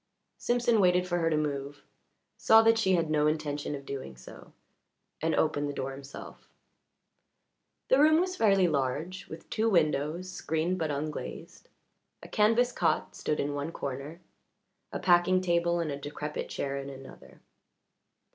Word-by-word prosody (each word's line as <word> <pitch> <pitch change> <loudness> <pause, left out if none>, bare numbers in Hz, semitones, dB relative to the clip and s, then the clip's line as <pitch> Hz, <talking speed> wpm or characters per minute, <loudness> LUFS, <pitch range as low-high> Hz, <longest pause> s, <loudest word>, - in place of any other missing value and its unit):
Simpson 240 -2 +2
waited 180 0 +3
for 175 -1 0
her 165 -1 +1
to 155 - +1
move, 145 -1 -3 0.5
saw 225 0 +6
that 225 0 +4
she 190 -4 +2
had 165 -3 0
no 150 -1 +3
intention 150 -1 -2
of 140 -1 -9
doing 130 - -7
so, 65 - -13 0.7
and 160 +1 +1
opened 145 -2 +1
the - - -4
door 135 - -3
himself. 135 0 -11 1.4
The 260 - +4
room 310 +2 +6
was 370 +1 -1
fairly 195 - +4
large, 155 +5 -2
with 160 - -10
two 225 +1 +1
windows 160 -1 +1
screened 175 0 -2
but 160 -2 -1
unglazed; 150 +1 -6 0.5
a - - -9
canvas 230 +3 +3
cot - - 0
stood 150 - -2
in 145 +1 -1
one 145 +3 -3
corner, 140 +4 -6 0.7
a - - -3
packing 175 +1 +4
box 185 - -2
table 170 0 +1
and 165 -3 -2
a 140 - -4
decrepit 150 +1 -5
chair 140 0 -3
in 140 0 -6
another. 135 -1 -12
160 Hz, 155 wpm, -29 LUFS, 145-185 Hz, 1.4 s, saw